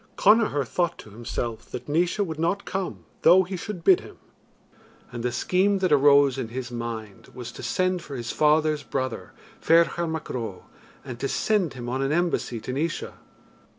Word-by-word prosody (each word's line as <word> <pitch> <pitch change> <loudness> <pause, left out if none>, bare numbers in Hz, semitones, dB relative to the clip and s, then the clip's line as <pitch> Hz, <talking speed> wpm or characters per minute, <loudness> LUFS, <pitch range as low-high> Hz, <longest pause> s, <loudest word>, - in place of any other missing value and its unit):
Connachar 205 - +4
thought 175 +2 -1
to 105 - -12
himself 115 +1 -5
that - - -7
Naois 170 +6 +1
would 160 -3 -6
not 175 +5 0
come 195 -1 -4 0.2
though 190 +1 +7
he 185 +1 -5
should 180 0 -6
bid 185 0 +6
him; - - -13 0.9
and 120 - -5
the 125 +1 -1
scheme 190 +9 +2
that 185 -3 0
arose 140 -2 +5
in 125 - -3
his 125 +2 -6
mind 115 -4 -6
was 125 -2 -7
to - - -10
send 185 -1 0
for 145 -4 -8
his 120 -2 -4
father's 155 0 +2
brother, 130 -3 -4 0.3
Ferchar 170 +1 +3
Mac 160 -1 -4
Ro, 110 -7 -5 0.4
and 125 -3 -7
to 135 - -1
send 190 -3 0
him 120 -1 -7
on 130 +2 -2
an 135 +1 0
embassy 170 -8 0
to 125 - -5
Naois. 155 +4 -2
145 Hz, 180 wpm, -25 LUFS, 125-175 Hz, 0.9 s, though